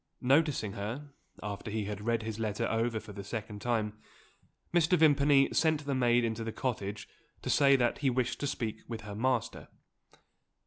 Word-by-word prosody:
Noticing 135 Hz, -5 st, +2 dB
her, 120 Hz, +9 st, -5 dB, 0.3 s
after 105 Hz, 0 st, -5 dB
he 105 Hz, -1 st, -2 dB
had 105 Hz, 0 st, -5 dB
read 115 Hz, -1 st, +1 dB
his 110 Hz, 0 st, -5 dB
letter 110 Hz, +1 st, -1 dB
over 115 Hz, 0 st, 0 dB
for 105 Hz, -, -11 dB
the 100 Hz, -, -7 dB
second 105 Hz, 0 st, -6 dB
time, 110 Hz, -2 st, -1 dB, 0.7 s
Mr. 175 Hz, +1 st, +4 dB
Vimpany 145 Hz, -3 st, +5 dB
sent 155 Hz, -2 st, +2 dB
the 140 Hz, -, -1 dB
maid 120 Hz, -2 st, +3 dB
into 115 Hz, 0 st, -2 dB
the 115 Hz, -, -3 dB
cottage 105 Hz, -5 st, -3 dB, 0.4 s
to -, -, -1 dB
say 140 Hz, -1 st, +5 dB
that 120 Hz, -2 st, +1 dB
he 140 Hz, -, +2 dB
wished 125 Hz, -1 st, -1 dB
to 145 Hz, -, -1 dB
speak 115 Hz, -5 st, -3 dB
with 115 Hz, -2 st, -5 dB
her 105 Hz, -1 st, -8 dB
master. 120 Hz, +2 st, -1 dB
115 Hz, 175 wpm, -31 LUFS, 105-135 Hz, 0.7 s, Vimpany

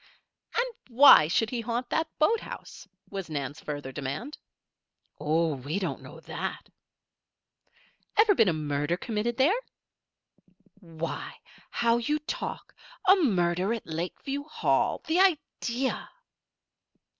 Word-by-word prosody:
"And 475 Hz, -, +3 dB, 0.2 s
why 245 Hz, -, +8 dB
should 220 Hz, +7 st, +1 dB
he 240 Hz, -2 st, -2 dB
haunt 240 Hz, +2 st, -3 dB
that 320 Hz, 0 st, +1 dB
boathouse?" 440 Hz, +9 st, -1 dB, 0.2 s
was 195 Hz, -3 st, -5 dB
Nan's 145 Hz, -1 st, -4 dB
further 145 Hz, -3 st, -5 dB
demand. 145 Hz, -, -5 dB, 0.8 s
"Oh! 160 Hz, +2 st, +1 dB
we 140 Hz, +6 st, -4 dB
don't 195 Hz, -, -3 dB
know -, -, -11 dB
that." -, -, -5 dB, 1.5 s
"Ever 430 Hz, -1 st, +6 dB
been 225 Hz, -, +4 dB
a -, -, +3 dB
murder 150 Hz, +1 st, -1 dB
committed 225 Hz, +3 st, -2 dB
there?" 335 Hz, -, +4 dB, 1.2 s
"Why! 165 Hz, -3 st, -6 dB, 0.3 s
how 235 Hz, 0 st, +2 dB
you 270 Hz, +6 st, 0 dB
talk! 305 Hz, +12 st, -5 dB, 0.3 s
A 380 Hz, -, +9 dB
murder 190 Hz, -, +1 dB
at 230 Hz, -, -8 dB
Lakeview 180 Hz, -, -4 dB
Hall? 310 Hz, -, +1 dB
The 330 Hz, +3 st, +1 dB
idea!" 285 Hz, -8 st, 0 dB
225 Hz, 115 wpm, -28 LUFS, -, 1.5 s, A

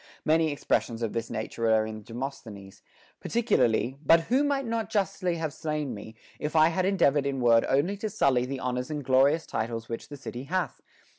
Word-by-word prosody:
Many 160 Hz, 0 st, +3 dB
expressions 120 Hz, -4 st, -1 dB
of 110 Hz, -, -2 dB
this 115 Hz, 0 st, -3 dB
nature 115 Hz, 0 st, -2 dB
are 110 Hz, -1 st, +3 dB
in 110 Hz, 0 st, -7 dB
Demosthenes; 115 Hz, -4 st, -8 dB, 0.4 s
particularly, 130 Hz, -, +1 dB
But 165 Hz, +3 st, +6 dB
who 250 Hz, -, +1 dB
might 280 Hz, -2 st, 0 dB
not 230 Hz, -1 st, -2 dB
justly 195 Hz, -3 st, 0 dB
have 160 Hz, -3 st, -3 dB
slain 150 Hz, -4 st, -3 dB
me, 110 Hz, +1 st, -9 dB, 0.2 s
if 150 Hz, +1 st, -4 dB
I 155 Hz, 0 st, +6 dB
had 180 Hz, +2 st, 0 dB
endeavored 145 Hz, -8 st, +2 dB
in 135 Hz, -1 st, -2 dB
word 115 Hz, -2 st, +4 dB
only 145 Hz, +9 st, +2 dB
to 215 Hz, +2 st, -3 dB
sully 130 Hz, -9 st, +2 dB
the 135 Hz, 0 st, -4 dB
honors 125 Hz, +1 st, -2 dB
and 150 Hz, -3 st, -4 dB
glorious 135 Hz, +5 st, +3 dB
titles 115 Hz, 0 st, -4 dB
which 115 Hz, -, -5 dB
the 145 Hz, -, -8 dB
city 130 Hz, -1 st, -7 dB
hath 185 Hz, +4 st, -2 dB
140 Hz, 190 wpm, -27 LUFS, 115-165 Hz, 0.4 s, But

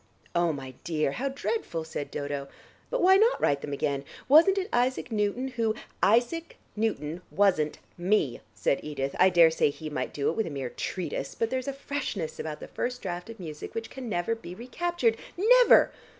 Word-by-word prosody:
"Oh, 170 Hz, -1 st, +2 dB
my 135 Hz, -3 st, -7 dB
dear, 155 Hz, -4 st, 0 dB
how 275 Hz, -, -2 dB
dreadful!" 270 Hz, -, -3 dB
said 160 Hz, -2 st, -5 dB
Dodo. 145 Hz, -1 st, -4 dB, 0.4 s
"But -, -, 0 dB
why 380 Hz, +1 st, +7 dB
not 450 Hz, +4 st, +4 dB
write 140 Hz, -1 st, +2 dB
them 145 Hz, -, -5 dB
again? 140 Hz, 0 st, -1 dB, 0.2 s
Wasn't 330 Hz, +8 st, +7 dB
it 380 Hz, -1 st, 0 dB
Isaac 245 Hz, 0 st, +1 dB
Newton, 215 Hz, +5 st, 0 dB
who 230 Hz, -3 st, 0 dB
" -, -, -33 dB, 0.2 s
"Isaac 330 Hz, +8 st, -3 dB, 0.2 s
Newton, 180 Hz, -7 st, -2 dB
wasn't 180 Hz, -7 st, +2 dB, 0.2 s
me," 175 Hz, -, +1 dB
said 140 Hz, -, +1 dB
Edith. 140 Hz, -2 st, -3 dB
"I 185 Hz, -, +7 dB
daresay 165 Hz, -4 st, +5 dB
he 155 Hz, +1 st, -7 dB
might 130 Hz, -3 st, -2 dB
do 140 Hz, +1 st, 0 dB
it -, -, -6 dB
with 225 Hz, -, 0 dB
a -, -, -3 dB
mere 135 Hz, -4 st, -4 dB
treatise, 185 Hz, -2 st, -4 dB
but 230 Hz, 0 st, -1 dB
there's 260 Hz, 0 st, -2 dB
a -, -, 0 dB
freshness 275 Hz, -, -4 dB
about 155 Hz, -1 st, -4 dB
the -, -, -7 dB
first 250 Hz, 0 st, -4 dB
draft 180 Hz, +1 st, -4 dB
of 230 Hz, -, -9 dB
music 155 Hz, -4 st, -7 dB
which 225 Hz, 0 st, -4 dB
can 260 Hz, -3 st, -6 dB
never 175 Hz, +2 st, 0 dB
be 205 Hz, -6 st, -8 dB
recaptured. 250 Hz, -, 0 dB, 0.2 s
Never! -, -, +6 dB
200 Hz, 190 wpm, -28 LUFS, 155-255 Hz, 0.4 s, why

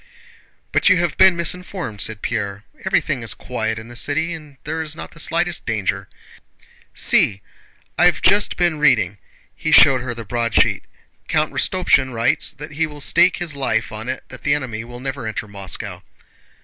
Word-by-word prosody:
"But -, -, +3 dB
you 185 Hz, -, +5 dB
have 170 Hz, -3 st, 0 dB
been 190 Hz, -1 st, +6 dB
misinformed," 170 Hz, -, -3 dB
said 110 Hz, -1 st, -3 dB
Pierre. 100 Hz, -2 st, -3 dB, 0.2 s
"Everything -, -, +1 dB
is -, -, -1 dB
quiet 110 Hz, 0 st, -3 dB
in 110 Hz, 0 st, -8 dB
the 120 Hz, -, -11 dB
city 160 Hz, +7 st, 0 dB
and 150 Hz, -4 st, -11 dB
there 160 Hz, +2 st, -3 dB
is 155 Hz, -1 st, -4 dB
not -, -, -8 dB
the 165 Hz, -, -14 dB
slightest 170 Hz, +1 st, -1 dB
danger. 100 Hz, -3 st, -2 dB, 0.9 s
See! 100 Hz, -2 st, +3 dB, 0.6 s
I've 175 Hz, -2 st, +5 dB
just 200 Hz, +2 st, +3 dB
been 175 Hz, -3 st, +1 dB
reading..." 110 Hz, -9 st, +3 dB, 0.4 s
He -, -, -2 dB
showed 135 Hz, -2 st, +7 dB
her 120 Hz, -1 st, -4 dB
the 115 Hz, -1 st, -8 dB
broadsheet. 115 Hz, -7 st, +1 dB, 0.4 s
"Count 155 Hz, 0 st, 0 dB
Rostopchín 140 Hz, -8 st, +2 dB
writes 115 Hz, 0 st, +1 dB
that 150 Hz, +1 st, -10 dB
he 160 Hz, +2 st, -1 dB
will 150 Hz, -1 st, -11 dB
stake 175 Hz, +5 st, +4 dB
his 170 Hz, -5 st, -4 dB
life 115 Hz, -5 st, -1 dB
on 110 Hz, +3 st, -6 dB
it 130 Hz, -, -4 dB
that -, -, -11 dB
the 145 Hz, 0 st, +2 dB
enemy 120 Hz, -6 st, -4 dB
will 120 Hz, +1 st, -10 dB
not 135 Hz, +2 st, -4 dB
enter 110 Hz, -1 st, -4 dB
Moscow." 100 Hz, -2 st, -6 dB
135 Hz, 175 wpm, -20 LUFS, 110-160 Hz, 0.9 s, showed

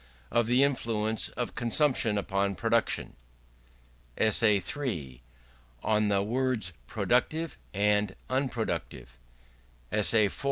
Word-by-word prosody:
Of 120 Hz, -1 st, +2 dB
the 125 Hz, +3 st, +4 dB
Influence 110 Hz, -5 st, 0 dB
of 120 Hz, -, -3 dB
Consumption 120 Hz, -2 st, +2 dB
upon 100 Hz, 0 st, -1 dB
Production 85 Hz, -, 0 dB, 1.0 s
ESSAY 110 Hz, -1 st, +4 dB, 0.2 s
III. 80 Hz, -, -4 dB, 0.6 s
On 105 Hz, -1 st, +2 dB
the 100 Hz, -1 st, +2 dB
Words 120 Hz, -4 st, 0 dB
Productive 160 Hz, +1 st, 0 dB, 0.2 s
and 105 Hz, -1 st, +1 dB
Unproductive 100 Hz, -, -3 dB, 0.7 s
ESSAY 105 Hz, +1 st, +3 dB
IV. 100 Hz, -, -5 dB
110 Hz, 95 wpm, -28 LUFS, 100-125 Hz, 1.0 s, the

